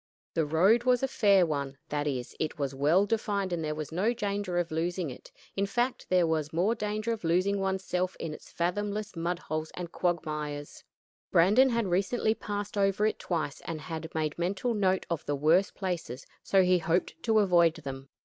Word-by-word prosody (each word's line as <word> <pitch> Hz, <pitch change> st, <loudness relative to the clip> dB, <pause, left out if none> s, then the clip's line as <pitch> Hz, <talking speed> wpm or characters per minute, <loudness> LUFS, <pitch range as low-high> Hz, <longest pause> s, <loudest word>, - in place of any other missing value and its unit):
The 160 Hz, -2 st, +1 dB
road 190 Hz, +10 st, +4 dB
was 250 Hz, 0 st, +3 dB
a -, -, +3 dB
fair 200 Hz, -7 st, +4 dB
one; 140 Hz, -3 st, -3 dB
that 145 Hz, 0 st, -1 dB
is, 130 Hz, -4 st, -3 dB
it 155 Hz, -, -2 dB
was 140 Hz, -2 st, -2 dB
well 155 Hz, +8 st, +3 dB
defined 205 Hz, -3 st, -1 dB
and 165 Hz, -2 st, -2 dB
there 150 Hz, 0 st, -2 dB
was 155 Hz, 0 st, -5 dB
no 195 Hz, +8 st, +1 dB
danger 200 Hz, -5 st, -2 dB
of 175 Hz, -1 st, 0 dB
losing 170 Hz, -1 st, -1 dB
it; 125 Hz, -, -12 dB, 0.2 s
in 200 Hz, 0 st, 0 dB
fact, 240 Hz, +5 st, -1 dB
there 180 Hz, -2 st, +4 dB
was 155 Hz, -2 st, -1 dB
more 180 Hz, +7 st, +2 dB
danger 215 Hz, 0 st, -2 dB
of 225 Hz, -4 st, -4 dB
losing 185 Hz, +4 st, +2 dB
one's 190 Hz, 0 st, -1 dB
self 180 Hz, 0 st, -1 dB
in 160 Hz, -2 st, -4 dB
its -, -, -12 dB
fathomless 205 Hz, +4 st, -2 dB
mud 170 Hz, +1 st, -1 dB
holes 155 Hz, -2 st, -4 dB
and 175 Hz, -2 st, -6 dB
quagmires. 150 Hz, -4 st, -3 dB, 0.5 s
Brandon 210 Hz, +11 st, +5 dB
had 235 Hz, -2 st, +1 dB
recently 195 Hz, +5 st, +1 dB
passed 205 Hz, -1 st, -4 dB
over 195 Hz, +1 st, +2 dB
it 215 Hz, -, 0 dB
twice, 155 Hz, -5 st, -3 dB
and 165 Hz, -2 st, -4 dB
had 160 Hz, 0 st, -6 dB
made 155 Hz, 0 st, -1 dB
mental 195 Hz, +7 st, 0 dB
note 190 Hz, -3 st, +1 dB
of 170 Hz, -3 st, -3 dB
the 145 Hz, -, 0 dB
worst 160 Hz, +7 st, +3 dB
places, 170 Hz, -, -4 dB, 0.2 s
so 195 Hz, -1 st, +3 dB
he 180 Hz, 0 st, +4 dB
hoped 175 Hz, -, -1 dB
to 225 Hz, -2 st, +2 dB
avoid 175 Hz, -5 st, +4 dB
them. 135 Hz, -3 st, -7 dB
180 Hz, 195 wpm, -29 LUFS, 160-205 Hz, 0.5 s, Brandon